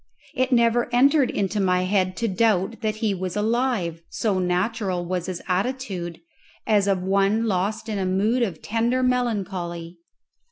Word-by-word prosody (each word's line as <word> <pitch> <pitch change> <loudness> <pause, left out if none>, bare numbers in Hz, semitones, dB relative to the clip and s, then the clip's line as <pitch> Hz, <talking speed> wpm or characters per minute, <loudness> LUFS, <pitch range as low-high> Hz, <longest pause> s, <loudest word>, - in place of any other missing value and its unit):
It 255 0 0
never 235 0 +3
entered 275 +2 +4
into 200 +1 -1
my 180 -2 +2
head 185 -1 0
to 230 - 0
doubt 215 +1 +1
that 215 -1 -1
he 215 -2 0
was 185 -1 -4
alive, 215 -6 0
so 205 -4 0
natural 180 0 -1
was 180 0 -3
his 185 -2 -5
attitude, 185 -4 -2 0.5
as 205 -3 +3
of 190 -2 +1
one 200 +4 +2
lost 210 +2 -1
in 210 -2 -2
a 190 - -1
mood 210 +7 +1
of 190 -9 -2
tender 235 +4 0
melancholy. 190 -9 -2
200 Hz, 155 wpm, -24 LUFS, 185-230 Hz, 0.5 s, entered